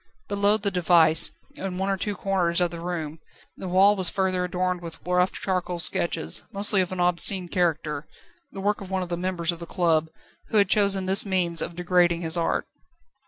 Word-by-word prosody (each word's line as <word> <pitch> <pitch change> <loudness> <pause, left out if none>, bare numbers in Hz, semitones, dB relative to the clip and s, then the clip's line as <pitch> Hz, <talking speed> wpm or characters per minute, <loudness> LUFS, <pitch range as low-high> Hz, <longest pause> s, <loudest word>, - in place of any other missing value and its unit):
Below 205 +1 +2
the 200 -1 -1
device, 165 -3 +4 0.2
in 185 -1 -6
one 190 +1 -1
or - - 0
two 205 +2 -4
corners 185 -4 0
of 175 -1 0
the 170 - -8
room, 165 -3 -5 0.4
the 190 - -8
wall 195 +3 +4
was 185 -3 +5
further 185 -2 -1
adorned 180 0 -2
with 165 -2 -9
rough 180 +1 +1
charcoal 180 -2 -3
sketches, 170 -1 +1
mostly 200 0 +2
of 185 - -3
an 185 - -5
obscene 180 +1 +4
character, 160 -4 -2 0.4
the 195 - -8
work 205 +1 -1
of 195 - -9
one 190 -1 -2
of 175 - -9
the 175 - -2
members 175 -1 -2
of 170 - -9
the 170 - -9
club, 165 -4 0 0.4
who 220 - -1
had 200 -2 +3
chosen 200 -3 +2
this 190 +1 +4
means 180 -4 0
of 170 - -5
degrading 175 -1 +1
his 165 0 0
art. 170 -1 -1
180 Hz, 200 wpm, -24 LUFS, 170-190 Hz, 0.4 s, was